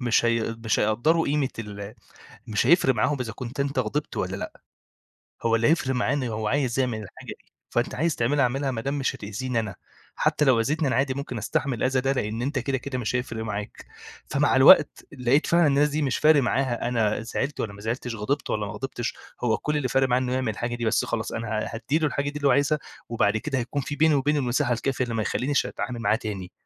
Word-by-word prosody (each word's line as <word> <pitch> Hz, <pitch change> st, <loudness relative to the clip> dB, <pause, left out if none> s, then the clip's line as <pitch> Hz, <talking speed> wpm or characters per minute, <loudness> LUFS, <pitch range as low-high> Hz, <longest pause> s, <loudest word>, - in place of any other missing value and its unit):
مش 120 Hz, -1 st, +2 dB
هي 115 Hz, -1 st, 0 dB
مش 110 Hz, -, +2 dB
هيقدّروا 120 Hz, +11 st, +2 dB
قيمة 140 Hz, -2 st, +1 dB
ال 105 Hz, -1 st, -7 dB, 0.5 s
مش 110 Hz, +3 st, 0 dB
هيفرق 150 Hz, -5 st, +5 dB
معاهم 140 Hz, +6 st, +1 dB
إذا 115 Hz, -3 st, -5 dB
كنت 125 Hz, +4 st, -7 dB
أنت 140 Hz, -1 st, 0 dB
غضبت 145 Hz, +6 st, -2 dB
والّا -, -, -2 dB
لأ، -, -, -7 dB, 0.8 s
هو 115 Hz, 0 st, +3 dB
اللي 115 Hz, +4 st, +2 dB
هيفرق 150 Hz, -5 st, +2 dB
معاه 125 Hz, +1 st, +1 dB
إن 145 Hz, -, -1 dB
هو 110 Hz, -2 st, -2 dB
عايز 135 Hz, -1 st, 0 dB
يعمل 120 Hz, -4 st, -1 dB
الحاجة 100 Hz, -, -12 dB
دي، -, -, -32 dB, 0.2 s
فأنت 120 Hz, +1 st, 0 dB
عايز 160 Hz, +3 st, 0 dB
تعملها 140 Hz, +4 st, +2 dB
اعملها 135 Hz, +3 st, 0 dB
ما 115 Hz, -3 st, -3 dB
دام 140 Hz, +3 st, -2 dB
مش 135 Hz, -, -1 dB
هتأذيني 115 Hz, +4 st, -3 dB
أنا، 105 Hz, -3 st, -5 dB, 0.4 s
حتى 150 Hz, -, +2 dB
لو 130 Hz, -5 st, +4 dB
أذيتني 150 Hz, +5 st, 0 dB
أنا 130 Hz, -, +1 dB
عادي 135 Hz, 0 st, +1 dB
ممكن 135 Hz, -3 st, -5 dB
أستحمل 140 Hz, 0 st, -1 dB
الأذى 130 Hz, 0 st, +1 dB
ده 135 Hz, +1 st, +1 dB
لإن 115 Hz, -2 st, -2 dB
أنت 140 Hz, +1 st, -1 dB
كده 135 Hz, +1 st, -1 dB
كده 130 Hz, 0 st, -5 dB
مش 120 Hz, +1 st, -1 dB
هيفرق 115 Hz, -3 st, -3 dB
معاك. 105 Hz, -1 st, -6 dB, 0.4 s
فمع -, -, +2 dB
الوقت -, -, +6 dB
لقيت 130 Hz, +2 st, +2 dB
فعلًا 170 Hz, -1 st, +4 dB
الناس 145 Hz, +1 st, +3 dB
دي 150 Hz, +1 st, -1 dB
مش 135 Hz, -3 st, 0 dB
فارق 150 Hz, -2 st, +5 dB
معاها 125 Hz, -2 st, 0 dB
أنا 110 Hz, -3 st, +1 dB
زعلت 135 Hz, +5 st, -3 dB
والّا 105 Hz, -, -3 dB
ما 100 Hz, -, -12 dB
زعلتش، 120 Hz, +2 st, -3 dB
غضبت 140 Hz, +8 st, -2 dB
والّا 105 Hz, -1 st, -1 dB
ما 95 Hz, -, -6 dB
غضبتش، 120 Hz, +1 st, -4 dB, 0.3 s
هو 110 Hz, -2 st, +2 dB
كل 150 Hz, 0 st, -1 dB
اللي 140 Hz, -3 st, 0 dB
فارق 135 Hz, +1 st, +2 dB
معاه 125 Hz, 0 st, +3 dB
إنه 125 Hz, -1 st, -2 dB
يعمل 130 Hz, -3 st, 0 dB
الحاجة 120 Hz, +3 st, -3 dB
دي 120 Hz, -, -4 dB
بس، 110 Hz, +1 st, +2 dB
خلاص 115 Hz, -1 st, -3 dB
أنا 115 Hz, -1 st, -4 dB
ه 110 Hz, 0 st, -1 dB
هادّي 135 Hz, +7 st, 0 dB
له 155 Hz, -, +1 dB
الحاجة 145 Hz, 0 st, -1 dB
دي 150 Hz, -, -10 dB
اللي 145 Hz, -1 st, +2 dB
هو -, -, +5 dB
عايزها 145 Hz, +3 st, +2 dB, 0.3 s
وبعد 110 Hz, -2 st, +1 dB
كده 135 Hz, +4 st, -2 dB
هيكون 125 Hz, +4 st, -2 dB
في 145 Hz, +2 st, -5 dB
بيني 160 Hz, 0 st, +4 dB
وبينه 145 Hz, +2 st, +2 dB
المساحة 125 Hz, -2 st, +1 dB
الكافية 130 Hz, +2 st, -1 dB
اللي 120 Hz, -, -4 dB
ما 110 Hz, -, 0 dB
يخلّينيش 140 Hz, +6 st, 0 dB
أتعامل 120 Hz, -2 st, -5 dB
معاه 110 Hz, -1 st, +2 dB
تاني، 100 Hz, -6 st, -6 dB
125 Hz, 230 wpm, -25 LUFS, 115-140 Hz, 0.8 s, الوقت